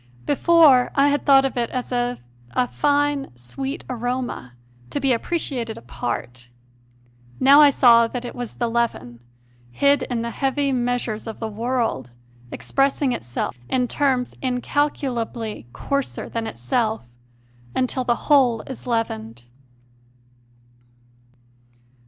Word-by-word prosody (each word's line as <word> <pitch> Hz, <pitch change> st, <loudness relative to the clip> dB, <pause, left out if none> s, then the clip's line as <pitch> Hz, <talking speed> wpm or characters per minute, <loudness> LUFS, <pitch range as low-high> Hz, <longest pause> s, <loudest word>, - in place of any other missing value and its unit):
Before 290 Hz, -4 st, +5 dB
I 280 Hz, +1 st, +4 dB
had 290 Hz, +1 st, -1 dB
thought 270 Hz, -1 st, +6 dB
of 270 Hz, -, -2 dB
it 235 Hz, -1 st, 0 dB
as 255 Hz, 0 st, -4 dB
of 245 Hz, 0 st, -1 dB, 0.4 s
a 250 Hz, -, +1 dB
fine, 290 Hz, 0 st, 0 dB
sweet 265 Hz, -, -5 dB
aroma, 245 Hz, -, -4 dB, 0.4 s
to -, -, -2 dB
be 270 Hz, -2 st, +2 dB
appreciated 240 Hz, -4 st, -3 dB
apart; 120 Hz, +1 st, -5 dB, 0.9 s
now 280 Hz, +3 st, +7 dB
I 295 Hz, -, +8 dB
saw 235 Hz, -4 st, +6 dB
that 245 Hz, +1 st, -5 dB
it 240 Hz, -, -6 dB
was 245 Hz, -2 st, -6 dB
the 240 Hz, -, -1 dB
leaven, 225 Hz, -, -2 dB, 0.5 s
hid 280 Hz, -, +3 dB
in 240 Hz, -3 st, -2 dB
the 235 Hz, -, -3 dB
heavy 275 Hz, +1 st, 0 dB
meas 245 Hz, 0 st, 0 dB
ures 220 Hz, 0 st, -5 dB
of 225 Hz, -, -7 dB
the 225 Hz, -, -3 dB
world, 225 Hz, -, -2 dB, 0.4 s
expressing 275 Hz, 0 st, 0 dB
itself 120 Hz, -, -3 dB
in 250 Hz, -1 st, +1 dB
terms 260 Hz, -2 st, 0 dB
incalcu 270 Hz, +2 st, -1 dB
lably 225 Hz, -, -5 dB
coarser 280 Hz, -, -3 dB
than 230 Hz, -1 st, -4 dB
itself, 215 Hz, -, -2 dB, 0.7 s
until 255 Hz, 0 st, 0 dB
the 240 Hz, -1 st, -1 dB
whole 255 Hz, -7 st, +4 dB
is 260 Hz, -1 st, -9 dB
leavened. 120 Hz, -, -3 dB
245 Hz, 130 wpm, -22 LUFS, 225-275 Hz, 0.9 s, I